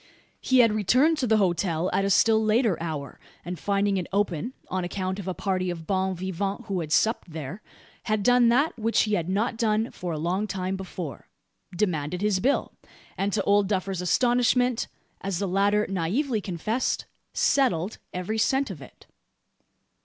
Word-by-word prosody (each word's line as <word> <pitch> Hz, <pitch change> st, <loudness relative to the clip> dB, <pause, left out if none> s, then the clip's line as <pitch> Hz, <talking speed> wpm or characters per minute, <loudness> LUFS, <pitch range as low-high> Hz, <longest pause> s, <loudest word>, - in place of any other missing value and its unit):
He 260 Hz, -1 st, +5 dB
had 230 Hz, -2 st, +4 dB
returned 255 Hz, -, +3 dB
to 255 Hz, -, 0 dB
the 220 Hz, 0 st, +4 dB
hotel 175 Hz, -3 st, +1 dB
at 195 Hz, -, +2 dB
a 195 Hz, -, +1 dB
still 220 Hz, +3 st, +4 dB
later 220 Hz, -2 st, +3 dB
hour; 155 Hz, -4 st, -5 dB, 0.3 s
and 180 Hz, 0 st, -5 dB
finding 200 Hz, 0 st, +1 dB
it 180 Hz, -, -3 dB
open 195 Hz, -, -1 dB
on 185 Hz, 0 st, -2 dB
account 185 Hz, +1 st, -3 dB
of 195 Hz, -, -7 dB
a 185 Hz, -, -2 dB
party 185 Hz, -2 st, -1 dB
of 165 Hz, -2 st, -5 dB
bons 190 Hz, 0 st, 0 dB
vivants 195 Hz, +4 st, -3 dB
who 195 Hz, -4 st, -2 dB
had 155 Hz, -3 st, -5 dB
supped 220 Hz, +2 st, +2 dB
there 160 Hz, +5 st, -6 dB, 0.4 s
had 215 Hz, -3 st, 0 dB
done 245 Hz, 0 st, +5 dB
that 265 Hz, +3 st, +2 dB
which 225 Hz, +1 st, +2 dB
he 215 Hz, -, -1 dB
had 175 Hz, -3 st, 0 dB
not 220 Hz, +4 st, 0 dB
done 220 Hz, 0 st, +1 dB
for 180 Hz, -2 st, -5 dB
a 160 Hz, -, -3 dB
long 180 Hz, +7 st, -1 dB
time 190 Hz, -1 st, -2 dB
before 180 Hz, -, -7 dB, 0.5 s
demanded 175 Hz, -2 st, -1 dB
his 210 Hz, -3 st, +2 dB
bill, 270 Hz, +8 st, 0 dB, 0.4 s
and 200 Hz, +1 st, -1 dB
to 215 Hz, -, +1 dB
Old 200 Hz, 0 st, +3 dB
Duffer's 190 Hz, -2 st, -1 dB
astonishment 245 Hz, +4 st, +2 dB, 0.3 s
as 195 Hz, -3 st, -2 dB
the 200 Hz, +2 st, -1 dB
latter 200 Hz, +3 st, +2 dB
naively 210 Hz, -, -1 dB
confessed 210 Hz, +7 st, -2 dB, 0.3 s
settled 220 Hz, -, +1 dB
every 185 Hz, +5 st, -3 dB
cent 265 Hz, +1 st, +1 dB
of 160 Hz, -7 st, -9 dB
it! -, -, -14 dB
195 Hz, 175 wpm, -26 LUFS, 180-220 Hz, 0.5 s, He